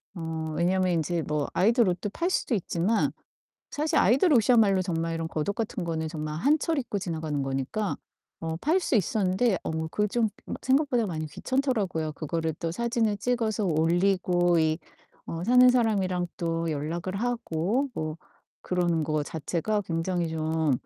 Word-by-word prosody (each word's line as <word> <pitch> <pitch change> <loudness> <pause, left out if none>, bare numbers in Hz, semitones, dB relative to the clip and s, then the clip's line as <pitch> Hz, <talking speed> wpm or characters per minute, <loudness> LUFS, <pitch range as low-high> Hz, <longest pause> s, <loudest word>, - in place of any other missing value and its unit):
어 160 -2 -4
왜냐면 185 +1 +2
인제 165 0 0
뭐 150 -1 -1
아이돌 225 +1 +4
옷도 185 +4 -2
팔 345 - -1
수도 270 - 0
있지만 195 +2 +1 0.6
사실 305 +2 0
아이들 275 - +4
옷이야말로 215 -5 +4
정말 165 -2 -2
이런 165 0 -3
겉옷 155 -2 -2
같은 215 -4 -3
거는 160 -1 -2
정말 155 -1 -4
한 295 - +3
철 325 +1 -1
입고 225 -6 -2
지나가는 160 -6 -3
거니까 135 +10 -2 0.4
어 160 0 -3
팔 325 +6 +3
수 295 - -1
있었는데 195 +1 +2
어 - - -2 0.2
그게 210 +5 0
좀 230 0 +1 0.2
막 - - -5
생각보다 260 -4 +2
많이 155 -3 -3
귀찮더라고요. 200 - -1
그거를 160 +1 -2
또 165 - -2
사진을 230 -1 0
찍어서 225 -3 0
올리고 175 +1 +2
이 160 +1 +2 0.5
어 165 +1 -4
사는 250 +2 +7
사람이랑 195 -7 +2
또 165 -1 -1
연락을 165 +5 -3
하고 235 - -1
뭐 155 0 -3 0.5
그러는 175 -3 0
거 155 0 0
자체가 170 +7 -2
굉장히 170 0 -1
좀 160 -2 0
180 Hz, 330 characters per minute, -27 LUFS, 160-225 Hz, 0.6 s, 사는